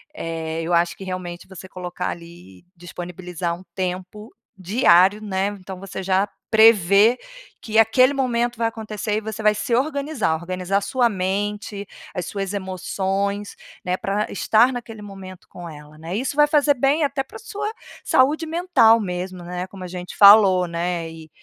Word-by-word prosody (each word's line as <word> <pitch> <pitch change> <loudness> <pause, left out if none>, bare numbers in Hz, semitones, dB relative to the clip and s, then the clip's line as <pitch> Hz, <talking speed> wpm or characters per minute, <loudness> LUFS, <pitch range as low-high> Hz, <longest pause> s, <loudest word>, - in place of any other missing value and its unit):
eh, 165 - -4
eu 170 +2 -2
acho 170 0 +2
que - - -9
realmente 185 -2 -6
você 190 0 -11
colocar 180 -1 -5
ali 170 - -11
disponibilizar 175 0 -5
um 175 - -13
tempo 185 +3 -5 0.2
diário, 190 0 +4
né, 195 -1 -1
então 185 0 -9
você 190 0 -7
já 190 +2 +1 0.2
prevê 220 0 +5 0.4
que 220 0 +1
aquele 255 +5 +5
momento 240 -3 -1
vai 230 0 +1
acontecer 215 -2 -4
e 220 - -2
você 220 +1 -6
vai 210 0 +4
se 235 +3 -3
organizar. 280 - 0
Organizar 185 +3 -2
sua 245 +2 +1
mente, 205 +1 -3 0.3
as 180 -3 -4
suas 195 -1 -4
emoções, 195 +1 -3 0.3
né, 180 0 -1
pra 205 +2 -2
estar 225 +5 +3
naquele 230 -3 -7
momento 195 -3 -11
com 175 -1 -9
ela, 150 0 -13
né? 165 +3 -6
Isso 260 +5 -2
vai 295 - +6
fazer 290 -1 +3
bem 275 +5 +2
até 275 -1 -1
pra - - -12
sua 425 -1 -5 0.3
saúde 295 +5 +2
mental 320 -9 +4
mesmo, 180 -2 -5
né, 180 +1 -5
como 190 0 -11
a 180 - -5
gente 180 0 -8
falou, 200 -3 +7
né, 170 0 -3
e 160 -1 -12
195 Hz, 160 wpm, -22 LUFS, 180-225 Hz, 0.4 s, falou